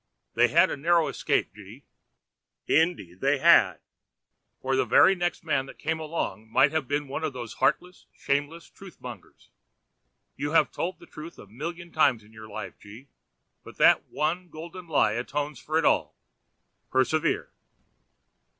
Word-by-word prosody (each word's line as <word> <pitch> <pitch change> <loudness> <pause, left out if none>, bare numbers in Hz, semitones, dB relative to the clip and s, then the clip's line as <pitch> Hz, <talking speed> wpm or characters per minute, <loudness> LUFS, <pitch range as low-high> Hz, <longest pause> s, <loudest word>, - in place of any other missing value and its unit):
'They 120 +2 +4
had 170 +7 +4
a - - -2
narrow 165 +2 +2
escape, - - -1
G— 105 +6 -13 0.4
.' - - -61
'Indeed 160 - 0
they 140 +1 +2
had.' - - +5 0.8
'For 130 0 -1
the 130 - +2
very 190 - +5
next 175 -2 -2
man 135 -4 0
that - - -12
came 160 +1 -2
along 155 -8 -4
might 135 +5 +4
have 155 -4 -2
been 145 +1 -2
one 140 +4 -5
of 155 -3 -2
these 120 -3 -7
heartless 180 0 0
and - - -32
shameless 145 +4 -2
truth 195 -3 -14
mongers. 120 -6 -12 0.8
You 145 +3 -3
have 165 - +4
told 180 +2 -3
the - - -15
truth 160 +3 -10
a - - -12
million 170 - -7
times 135 -8 +2
in 105 +1 -20
your 110 0 -11
life, 105 -4 -8
G—, 110 +7 -14 0.5
but - - -13
that - - +5
one 165 +5 -2
golden 170 +3 -10
lie 145 -9 +2
atones 140 +4 -3
for 155 +1 -2
it 160 - +1
all. - - +2 0.7
Persevere.' 130 +4 0
145 Hz, 165 wpm, -26 LUFS, 120-165 Hz, 0.8 s, had